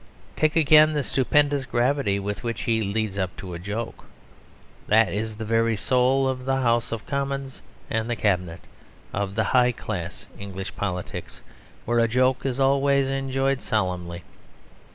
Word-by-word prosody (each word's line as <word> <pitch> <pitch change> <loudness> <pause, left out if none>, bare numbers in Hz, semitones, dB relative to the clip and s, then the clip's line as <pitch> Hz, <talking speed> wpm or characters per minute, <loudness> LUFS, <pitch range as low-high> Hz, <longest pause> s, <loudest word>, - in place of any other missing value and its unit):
Take 155 +1 +1
again 155 -1 +6
the 145 -2 0
stupendous 140 +2 +2
gravity 125 -3 +1
with 100 -1 -4
which 115 -1 -3
he 115 -1 +1
leads 100 -1 -2
up 95 -1 -2
to 90 -2 -7
a 85 - -5
joke. 105 +5 -5 0.8
That 110 +1 +4
is 110 +1 -3
the 110 +1 -6
very 115 +1 +2
soul 130 +4 +2
of 130 -1 -2
the 135 0 +1
House 120 -2 +1
of 115 -2 -4
Commons 140 -1 -3 0.3
and 110 +1 -2
the 120 - 0
Cabinet, 90 -5 -1 0.5
of 100 -1 -2
the 110 - +2
high 125 +3 +3
class 90 -7 -6
English 95 -1 -6
politics, 90 -3 -5 0.4
where 120 +1 +1
a 115 - +4
joke 130 +3 +1
is 130 0 -2
always 140 0 +3
enjoyed 135 0 0
solemnly. 90 -4 -2
115 Hz, 155 wpm, -24 LUFS, 100-135 Hz, 0.8 s, again